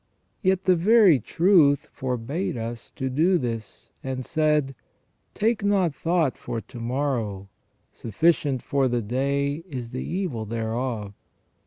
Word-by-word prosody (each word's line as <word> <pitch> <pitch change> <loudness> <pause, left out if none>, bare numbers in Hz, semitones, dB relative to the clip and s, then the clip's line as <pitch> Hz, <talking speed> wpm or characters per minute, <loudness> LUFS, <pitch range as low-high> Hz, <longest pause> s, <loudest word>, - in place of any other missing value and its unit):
Yet 190 -2 +2
the 185 -1 +4
Very 190 - +5
Truth 160 - +3
forbade 130 +6 -3
us 115 0 -6
to 130 - -3
do 165 +8 +3
this, 115 -6 -5
and 130 -1 -4
said: 150 -3 +1 0.3
' - - -45
Take 220 0 +1
not 195 -6 +2
thought 165 -4 0
for 115 - -4
to 120 +2 -11
morrow; 115 -6 -2 0.4
sufficient 140 - 0
for 140 -2 +1
the 120 -2 -1
day 140 +6 -1
is 125 -5 -6
the 130 - -4
evil 170 - -3
thereof. 115 -1 -3
135 Hz, 135 wpm, -25 LUFS, 120-170 Hz, 0.4 s, Very